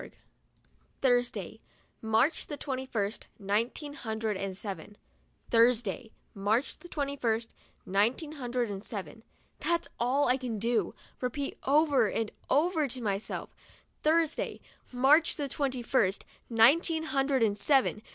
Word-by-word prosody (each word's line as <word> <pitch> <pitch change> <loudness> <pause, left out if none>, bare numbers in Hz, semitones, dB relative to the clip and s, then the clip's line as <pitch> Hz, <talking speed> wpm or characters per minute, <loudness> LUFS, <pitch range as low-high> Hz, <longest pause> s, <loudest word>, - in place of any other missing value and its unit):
11 - - -13 0.9
Thursday, 240 -5 +1 0.4
March 225 +8 +1
the 295 - -5
twenty 265 -2 -4
first, 210 -3 -3
nineteen 230 +9 -2
hundred 220 -5 -3
and 190 0 -4
seven. 205 0 -7 0.5
Thursday, 230 -1 +3 0.2
March 215 +7 0
the 350 - -12
twenty 280 -4 -3
first, 230 -3 -1 0.3
nineteen 230 - +1
hundred 250 -4 -2
and 195 0 -6
seven. 200 -3 -7 0.4
That's 340 0 0
all 260 +4 +2
I 250 +1 +3
can 250 -4 -4
do, 225 -3 0 0.3
repeat 275 +3 -2
over 280 -5 +4
and 225 +1 -2 0.2
over 315 +1 +2
to 255 0 -4
myself, 205 -3 -3 0.5
"Thursday, 320 0 +1 0.3
March 275 +6 +4
the 290 -2 -2
twenty 265 -2 -2
first, 200 -6 +1 0.2
nineteen 305 +8 +4
hundred 270 -4 +1
and 205 -2 +2
seven. 255 0 +2
245 Hz, 130 wpm, -30 LUFS, 220-280 Hz, 0.9 s, over